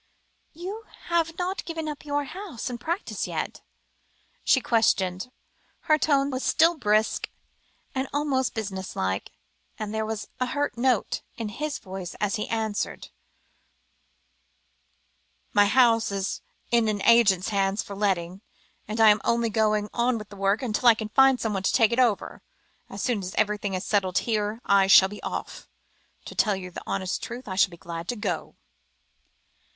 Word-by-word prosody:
"You 385 +7 -7 0.2
have 330 -1 +1
not 370 +2 -2
given 325 -2 -5
up 300 -1 -6
your 290 0 0
house 305 - -6
and 240 -1 -6
practice 340 +9 -3
yet?" - - -4 0.8
she 265 - +4
questioned, 195 -6 +1
and 250 - -27 0.5
her 310 0 +3
tone 280 -2 +2
was 260 0 -3
still 330 +2 +4
brisk, 215 -5 +1 0.8
almost 280 -4 0
business 195 -4 -5
like, 95 +1 -2 0.5
and 215 -1 -5
there 220 0 -1
was 220 -1 -4
a 255 - 0
hurt 290 +3 -1
note 245 -1 +1
in 225 -2 -4
his 300 +7 -3
voice 190 -2 -7
as 210 0 -1
he 210 - -3
answered 220 -2 -2 2.4
"My 205 0 +5
house 230 -1 +4
is 195 -1 -3 0.3
in 235 -2 +3
an 205 -2 -1
agent's 210 -6 +5
hands 195 0 0
for 200 - -8
letting, 190 -2 -1 0.5
and 215 +2 -4
I 220 -1 +8
am 210 0 +4
only 235 -1 +1
going 215 -1 +1
on 240 0 +1
with 210 -1 -9
the 205 - -11
work, 195 +4 +1
until 240 +1 +3
I 230 - +6
can 220 -1 -5
find 270 +2 +5
someone 210 -4 -1
to 190 - +1
take 225 -3 +4
it 235 - 0
over; 235 -5 +1 0.5
as - - -6
soon 245 -5 +1
as 185 0 -6
everything 210 -2 0
is 185 +1 -4
settled 190 -3 +1
here, 215 0 -1
I 200 -1 +4
shall 190 0 +8
be 210 - -9
off. - - -6 0.6
To - - -8
tell 210 -3 +2
you 185 -1 -7
the - - -7
honest 190 -1 -2
truth, 245 +2 -7
I 190 - -4
shall 200 +1 +4
be 170 - -12
glad 170 0 -7
to 245 - -2
go." 195 -6 -3
220 Hz, 165 wpm, -26 LUFS, 200-255 Hz, 2.4 s, I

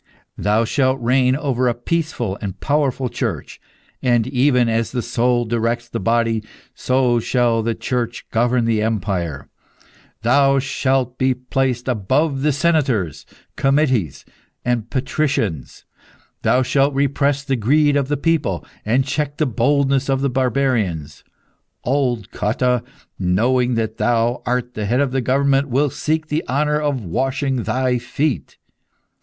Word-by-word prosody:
Thou 105 +3 +2
shalt 130 +2 +1
reign 125 +2 +2
over 135 -4 0
a 120 - +1
peaceful 125 - -2
and 95 -2 -5
powerful 140 -3 0
Church. - - -4 0.4
And, 120 -3 +2
even 125 -1 +2
as 115 0 0
the 125 -2 -2
soul 120 0 +1
directs 115 +1 -1
the - - -4
body, 115 +1 +1 0.3
so 125 -2 +1
shall 120 -1 +1
the 115 0 -1
Church 120 -2 -3
govern 120 +1 +2
the 115 -2 +1
empire. 90 -9 -2 0.8
Thou 135 +3 +4
shalt 130 -2 0
be 130 0 +2
placed 125 0 -2
above 135 +6 +1
senators, 140 - 0 0.3
comites, 135 - +1 0.4
and 120 -2 -1
patricians. 125 - -2 0.6
Thou 130 +1 +3
shalt 140 +2 +1
repress 140 0 +1
the 135 -2 0
greed 145 +6 +3
of 140 -2 +1
the 145 +1 -1
people, 145 - 0 0.2
and 125 +5 +1
check 145 +1 -2
the 155 - +1
boldness 135 +2 +1
of 135 0 +1
the 140 -1 0
barbarians. 115 - -1 0.6
Old 125 -5 0
Cotta, 125 +3 0 0.4
knowing 120 +7 +2
that 110 -1 -2
thou 120 0 +1
art 125 0 -1
the 105 -1 -3
head 120 +4 +1
of 140 -2 +1
the 135 0 0
government, 140 +2 +2
will 140 +3 +1
seek 155 +4 -1
the 155 +1 -2
honour 150 +3 +1
of 140 -7 -1
washing 135 - -1
thy 125 0 0
feet. 125 +3 -2
125 Hz, 140 wpm, -20 LUFS, 115-140 Hz, 0.8 s, Thou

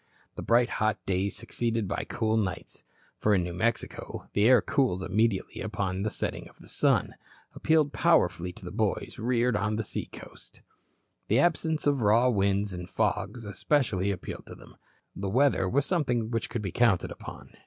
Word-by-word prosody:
The - - -7
bright 120 +1 +3
hot 110 -1 +2
days 95 +1 -1
succeeded 115 -1 -2
by 100 - -3
cool 110 -2 0
nights 95 -6 -3 0.4
for 105 -1 +3
in 90 - +2
New 85 0 -4
Mexico 115 +6 -3
the 105 - +3
air 125 +1 +7
cools 120 -10 0
immediately 110 0 0
upon 100 -3 -2
the 110 - 0
setting - - -4
of - - -23
the - - -16
sun - - +1 0.4
appealed 155 -2 +2
powerfully 90 - +2
to - - -9
boys - - -2
reared 120 0 +1
on 105 +1 0
the 110 - -1
seacoast. - - -9 0.6
The 110 - +3
absence 160 0 +1
of 145 -3 +2
raw 115 +4 +4
winds 100 -2 +1
and 90 0 -7
fogs 120 -3 -1
especially 100 -1 0
appealed 95 -3 -5
to - - -9
them. - - -16 0.4
The 95 0 -3
weather 125 -4 +2
was 140 +5 +1
something 125 -10 0
which 115 -2 -2
could 115 - -4
be 95 - -3
counted 115 -5 +2
upon. - - -10
110 Hz, 170 wpm, -28 LUFS, 100-125 Hz, 0.6 s, air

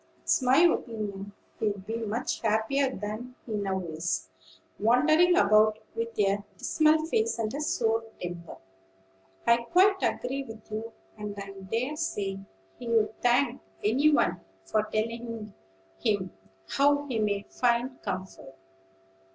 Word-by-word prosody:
It's - - +2
my 255 +1 +4
opinion 210 - 0 0.3
he'd 205 -3 -1
be 225 - -3
much 230 +3 -2
happier 225 +5 +2
than 225 +2 -6
he 230 - -8
now 195 -2 -1
is, 160 - -3 0.5
wandering 310 - +4
about 215 +1 +5 0.2
with 230 0 -4
a 200 0 +2
dismal 310 0 +3
face 445 +6 0
and 220 -1 -2
a 290 - -3
sour 225 -6 +1 0.2
temper." 175 -1 -6 0.9
"I 235 0 +6
quite 370 +11 +3
agree 270 +2 -1
with 225 -3 -12
you; 220 +2 -4 0.3
and 210 -1 -5
I 200 0 -6
dare 225 +9 -3
say 200 -11 -2 0.4
he'd 225 -3 0
thank 245 +3 +2 0.2
any 270 +9 +4
one 290 - +2 0.2
for 215 - +1
telling 230 -1 -3 0.5
him 190 - 0 0.3
how 285 +1 +3
he 250 -5 -2
may 205 -1 0
find 245 +1 0
comfort. 185 -8 -6
225 Hz, 130 wpm, -28 LUFS, 205-260 Hz, 0.9 s, I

